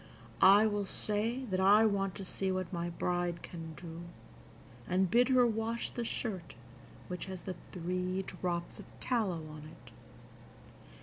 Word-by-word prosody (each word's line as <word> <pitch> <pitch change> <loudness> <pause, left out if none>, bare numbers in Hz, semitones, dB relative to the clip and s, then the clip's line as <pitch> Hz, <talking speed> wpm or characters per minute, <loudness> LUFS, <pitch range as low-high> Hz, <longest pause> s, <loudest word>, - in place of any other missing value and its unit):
I 200 +3 +8
will 205 -2 0
say 220 +6 -1
that 185 - +1
I 205 +4 +7
want 195 -3 +1
to 195 - -6
see 190 +1 -2
what 185 0 -2
my 170 0 -2
bride 175 0 -1
can 165 -2 -7
do, 165 0 -8 0.9
and 185 0 +2
bid 245 +2 +5
her 255 -2 +6
wash 225 0 -1
the 240 - -3
shirt 200 -7 -3 0.5
which 180 0 -4
has 185 -2 -6
the 185 - -3 0.2
three 180 +1 -2
drops 175 -2 -3
of - - -10
tallow 195 -10 0
on 155 0 -9
it. 120 -6 -15
185 Hz, 150 wpm, -33 LUFS, 175-215 Hz, 0.9 s, I